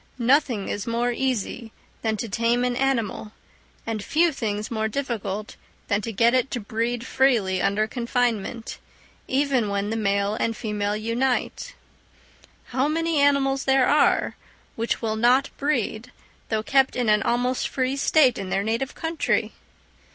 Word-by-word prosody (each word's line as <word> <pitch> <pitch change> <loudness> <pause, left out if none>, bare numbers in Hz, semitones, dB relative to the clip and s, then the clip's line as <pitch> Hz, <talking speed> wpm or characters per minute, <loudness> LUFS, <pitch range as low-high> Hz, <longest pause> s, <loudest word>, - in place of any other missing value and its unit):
Nothing 245 -4 +2
is 205 - -4
more 235 +1 0
easy 240 -2 -2 0.3
than 220 -1 -1
to 230 - -4
tame 230 +4 +1
an 250 -1 0
animal, 230 -5 -1 0.5
and 220 -2 -3
few 330 +7 +2
things 215 -6 -3
more 220 -1 0
difficult 215 -5 -4 0.3
than 205 -1 +1
to 225 - -4
get 230 +3 +3
it 255 +1 +2
to 245 - -3
breed 230 +3 -2
freely 230 -10 +2
under 210 +2 +1
confinement, 235 -1 -2 0.5
even 265 -5 +1
when 200 +1 -1
the - - -1
male 200 -1 +1
and 225 0 -1
female 210 -1 -2
unite. 245 - -1 0.9
How 260 +3 +1
many 330 0 0
animals 275 -1 +2
there 265 -1 +4
are 295 - +3 0.4
which 230 +1 -2
will 220 -1 0
not 250 +4 +3
breed, 250 -4 -1 0.4
though 220 -1 0
kept 270 +2 +2
in 245 -2 0
an 210 0 +4
almost 245 +2 0
free 260 0 -1
state 275 -4 +3
in 195 -1 -5
their 195 +1 0
native 230 +5 -2
country! 325 0 -1
235 Hz, 150 wpm, -24 LUFS, 215-265 Hz, 0.9 s, there